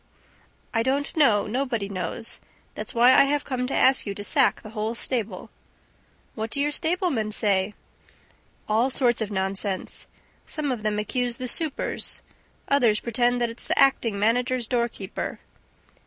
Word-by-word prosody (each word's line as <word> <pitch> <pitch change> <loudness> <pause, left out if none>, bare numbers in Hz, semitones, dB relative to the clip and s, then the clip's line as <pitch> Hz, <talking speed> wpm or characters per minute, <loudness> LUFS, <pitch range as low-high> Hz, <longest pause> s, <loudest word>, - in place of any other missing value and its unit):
"I 225 - +2
don't 275 +4 -1
know. 250 -10 +4
Nobody 235 -3 -2
knows. 185 +2 -4 0.3
That's - - -7
why 240 +2 +6
I 275 - +7
have 285 +1 0
come 250 -2 -2
to 270 - -2
ask 260 -3 +3
you 200 - -3
to 205 - -6
sack 265 +4 +2
the 215 - -9
whole 220 +1 -3
stable." 225 -6 -3 0.8
"What 220 0 -4
do 280 - -3
your 290 +1 +1
stablemen 320 - 0
say?" 205 -1 +2 0.9
"All 225 +5 +2
sorts 245 -3 +3
of 215 - -2
nonsense. 195 -1 -2 0.4
Some 300 -3 -2
of 240 -4 -3
them 210 0 -1
accuse 240 +3 -1
the 255 -1 -4
supers. 310 +2 -1 0.4
Others 240 -7 +3
pretend 245 +1 +1
that 235 -1 0
it's 230 - -2
the - - 0
acting 235 -6 +3
manager's 245 +4 +1
doorkeeper 235 -5 -3
235 Hz, 155 wpm, -25 LUFS, 210-265 Hz, 0.9 s, I